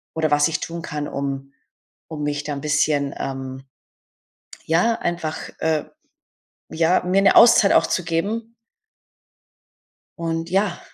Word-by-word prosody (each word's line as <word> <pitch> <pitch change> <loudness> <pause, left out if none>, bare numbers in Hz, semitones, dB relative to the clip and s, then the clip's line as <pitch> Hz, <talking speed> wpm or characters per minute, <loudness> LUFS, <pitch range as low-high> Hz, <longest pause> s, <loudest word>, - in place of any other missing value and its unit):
oder 160 -2 0
was 145 +1 +4
ich 155 - -3
tun 170 0 -5
kann, 150 -2 -4
um 140 0 -5 0.6
um 150 -2 -5
mich 145 0 -2
da 150 - -3
'n 140 - -6
bisschen, 145 -1 +1
ähm 135 0 -6 1.0
ja, 175 +8 +3
einfach 170 -2 -3
äh, 160 -2 0 0.8
ja, 165 +3 +2
mir 190 +2 +2
'ne 195 - +4
Auszeit 230 -4 +7
auch - - +4
zu 180 - -1
geben. 215 +8 -2 1.6
Und 165 0 -3
ja. 195 -1 0
160 Hz, 130 wpm, -22 LUFS, 145-175 Hz, 1.6 s, Auszeit